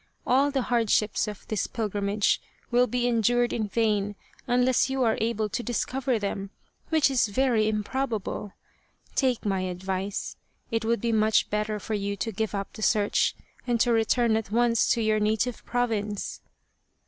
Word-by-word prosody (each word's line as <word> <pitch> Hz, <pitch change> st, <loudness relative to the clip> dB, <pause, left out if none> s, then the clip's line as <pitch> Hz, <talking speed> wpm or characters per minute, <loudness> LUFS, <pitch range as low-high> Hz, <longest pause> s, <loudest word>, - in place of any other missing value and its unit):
All 270 Hz, +3 st, +3 dB
the 275 Hz, -3 st, 0 dB
hard 235 Hz, -3 st, +1 dB
ships 210 Hz, +1 st, +2 dB
of 210 Hz, -1 st, -8 dB
this 215 Hz, -3 st, -1 dB
pilgrimage 205 Hz, -2 st, 0 dB, 0.3 s
will 245 Hz, +1 st, +4 dB
be 245 Hz, -1 st, -1 dB
endured 240 Hz, +1 st, +2 dB
in 220 Hz, -2 st, -1 dB
vain 205 Hz, -1 st, 0 dB, 0.3 s
unless 250 Hz, +1 st, +3 dB
you 265 Hz, -1 st, 0 dB
are 225 Hz, -2 st, +3 dB
able 220 Hz, -1 st, 0 dB
to 210 Hz, -, -2 dB
discover 250 Hz, +1 st, -1 dB
them, 200 Hz, -1 st, -3 dB, 0.4 s
which 315 Hz, -3 st, +3 dB
is 250 Hz, -4 st, +3 dB
very 225 Hz, -1 st, +2 dB
im 210 Hz, -1 st, -1 dB
probable. 220 Hz, -5 st, -3 dB, 0.6 s
Take 255 Hz, -5 st, +1 dB
my 195 Hz, -2 st, +1 dB
advice. 185 Hz, +2 st, -3 dB, 0.3 s
It 225 Hz, -1 st, 0 dB
would 230 Hz, -1 st, 0 dB
be 235 Hz, -, 0 dB
much 220 Hz, -1 st, +2 dB
better 210 Hz, 0 st, -1 dB
for 220 Hz, -, -5 dB
you 200 Hz, -1 st, -1 dB
to 225 Hz, +2 st, -3 dB
give 215 Hz, +1 st, -2 dB
up 200 Hz, 0 st, -4 dB
the 215 Hz, -, -9 dB
search 210 Hz, -1 st, +2 dB, 0.3 s
and 240 Hz, -1 st, +1 dB
to 240 Hz, -, +3 dB
return 225 Hz, 0 st, +2 dB
at 220 Hz, -3 st, -4 dB
once 230 Hz, +1 st, +2 dB
to 235 Hz, -, -1 dB
your 215 Hz, 0 st, +2 dB
native 220 Hz, +3 st, 0 dB
province." 215 Hz, -4 st, -2 dB
220 Hz, 170 wpm, -27 LUFS, 210-245 Hz, 0.6 s, will